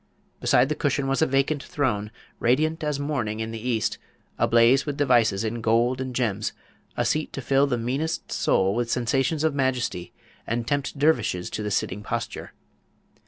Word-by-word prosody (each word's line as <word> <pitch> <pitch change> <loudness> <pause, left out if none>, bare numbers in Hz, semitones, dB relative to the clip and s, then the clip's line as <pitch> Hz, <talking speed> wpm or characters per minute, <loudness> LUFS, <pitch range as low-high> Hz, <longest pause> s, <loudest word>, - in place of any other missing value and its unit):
Beside 125 - +4
the 155 - 0
cushion 140 -2 0
was 135 +2 0
a 160 - +4
vacant 135 +2 +1
throne, 120 -10 -1 0.3
radiant 155 +6 +1
as 150 -2 -1
morning 125 -7 -2
in 110 0 -3
the 115 - -5
East, 115 -3 -1 0.4
ablaze 120 +4 +5
with 145 -2 -4
devices 120 -8 +3
in 115 +1 -3
gold 120 +3 +2
and 130 -1 -5
gems, 110 -5 -1 0.4
a 120 - +1
seat 150 +6 0
to - - -4
fill 135 +2 +2
the 125 -3 0
meanest 135 +8 -2
soul 95 +1 +2
with 120 +1 -1
sensations 135 +6 0
of 160 -2 +2
majesty 125 -10 -1 0.4
and 115 0 -2
tempt 145 +1 -1
dervishes 140 - +1
to - - -3
the 105 - -2
sitting 100 0 -1
posture. - - -4
125 Hz, 170 wpm, -25 LUFS, 115-140 Hz, 0.4 s, ablaze